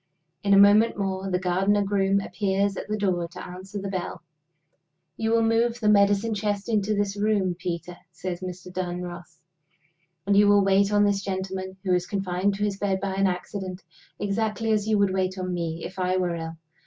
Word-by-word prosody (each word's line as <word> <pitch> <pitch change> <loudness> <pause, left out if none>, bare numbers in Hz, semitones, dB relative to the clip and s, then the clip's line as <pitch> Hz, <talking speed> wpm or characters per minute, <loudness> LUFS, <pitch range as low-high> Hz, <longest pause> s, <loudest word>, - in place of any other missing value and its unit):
In 200 -1 +4
a - - +6
moment 205 +3 +6
more, 195 -1 -2
the 180 - +1
gardener 190 +3 +1
groom 195 0 +1
appears 195 0 0
at - - -6
the 215 0 -2
door 180 -4 0
to 170 - -9
answer 185 +3 -8
the 195 - -4
bell. 180 -3 -4 0.9
"You 225 - -1
will 230 0 +3
move 230 +1 +2
the 215 -2 +2
medicine 205 +2 +4
chest 205 -1 -2
into 215 -1 +1
this 205 -1 -1
room, 205 -3 +1
Peter," 175 0 -5 0.2
says 175 +1 -5
Mr. 180 0 -7
Dunross. 175 -2 -5 0.9
"And 200 - +2
you 205 +1 +6
will 205 0 +5
wait 195 +1 +3
on 205 0 +4
this 200 -1 +2
gentleman, 190 -1 -4
who 185 -2 +1
is 180 0 +1
confined 195 0 -1
to 205 - -3
his 205 -2 -1
bed 195 -2 0
by 195 -1 -2
an 195 0 +2
accident, 185 0 -4 0.3
exactly 220 +2 -1
as 210 -1 +1
you 215 -1 +3
would 200 -2 +2
wait 185 0 -1
on 185 -1 -3
me 165 -1 -3
if 185 +1 -8
I 185 0 +1
were 180 -2 0
ill. 165 0 -6
195 Hz, 195 wpm, -25 LUFS, 185-205 Hz, 0.9 s, a